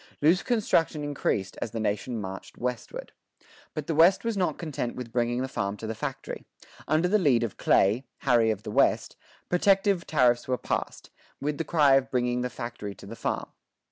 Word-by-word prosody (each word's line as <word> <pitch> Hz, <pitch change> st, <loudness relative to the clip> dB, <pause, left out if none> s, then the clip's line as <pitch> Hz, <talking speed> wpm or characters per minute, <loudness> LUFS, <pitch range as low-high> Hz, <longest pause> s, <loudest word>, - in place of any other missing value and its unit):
Loose 165 Hz, +6 st, +4 dB
construction 170 Hz, -, +1 dB
increased 120 Hz, -9 st, -2 dB
as -, -, -2 dB
the 115 Hz, -, -5 dB
nation 110 Hz, +3 st, -1 dB
marched 95 Hz, -1 st, -7 dB
westward.[25:1] 125 Hz, -, -7 dB, 0.3 s
But -, -, -3 dB
the 165 Hz, -, -1 dB
West 165 Hz, +5 st, +5 dB
was 230 Hz, -1 st, 0 dB
not 185 Hz, -3 st, 0 dB
content 150 Hz, -7 st, -4 dB
with 125 Hz, -2 st, -7 dB
bringing 120 Hz, +1 st, 0 dB
the -, -, -2 dB
farm 100 Hz, -5 st, -3 dB
to 110 Hz, -, -7 dB
the 110 Hz, -, -2 dB
factory. 110 Hz, -, -5 dB, 0.4 s
Under 160 Hz, +3 st, +2 dB
the 210 Hz, +3 st, +3 dB
lead 130 Hz, -10 st, +3 dB
of 115 Hz, -, -4 dB
Clay 110 Hz, +7 st, +3 dB
"Harry 120 Hz, -4 st, +4 dB
of 105 Hz, -2 st, -2 dB
the 105 Hz, -, -5 dB
West" -, -, +2 dB, 0.3 s
protective 195 Hz, 0 st, +2 dB
tariffs 125 Hz, -5 st, +3 dB
were 130 Hz, -1 st, 0 dB
passed, -, -, -4 dB, 0.3 s
with 145 Hz, +1 st, -2 dB
the -, -, +1 dB
cry 145 Hz, -5 st, +5 dB
of 135 Hz, -, -1 dB
bringing 125 Hz, -1 st, 0 dB
the 125 Hz, -, -1 dB
factory 120 Hz, -5 st, -6 dB
to -, -, -13 dB
the 110 Hz, +4 st, -8 dB
farm. -, -, -3 dB
125 Hz, 190 wpm, -27 LUFS, 115-165 Hz, 0.4 s, West